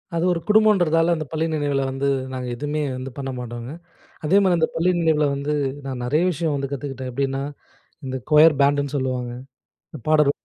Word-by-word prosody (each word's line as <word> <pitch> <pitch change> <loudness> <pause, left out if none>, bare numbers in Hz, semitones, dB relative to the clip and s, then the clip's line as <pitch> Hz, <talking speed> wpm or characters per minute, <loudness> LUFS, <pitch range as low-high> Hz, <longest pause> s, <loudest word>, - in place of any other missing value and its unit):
அது 165 - 0
ஒரு 170 - -2
குடும்பம்ன்றதால, 185 -6 +4
அந்த 155 -1 -4
பள்ளி 160 0 0
நினைவில 145 -2 0
வந்து 135 +1 -3 0.3
நாங்க 130 -1 -4
எதுவுமே 150 +4 -2 0.2
வந்து 130 +1 -5
பண்ண 135 -1 -4
மாட்டோங்க. 120 +1 -6 0.5
அதேமாதிரி 185 +1 +4
அந்த 160 -1 +2
பள்ளி 170 +3 +2
நினைவில 160 -3 +2
வந்து, 140 +2 -2 0.3
நான் 130 -2 -4
நிறைய 150 +7 +2
விஷயம் 160 -1 -1
வந்து 140 -1 -3
கத்துக்கிட்டேன். 135 -2 -5
எப்படின்னா, 135 +1 -1 0.6
இந்த 130 0 -3
க்வையர் 150 -1 +7
பேண்ட்டுன்னு 145 0 +2
சொல்லுவாங்க. 130 -2 -2 0.6
இந்த 155 - -9
பாடல் 150 -2 +5
145 Hz, 165 wpm, -22 LUFS, 135-160 Hz, 0.6 s, க்வையர்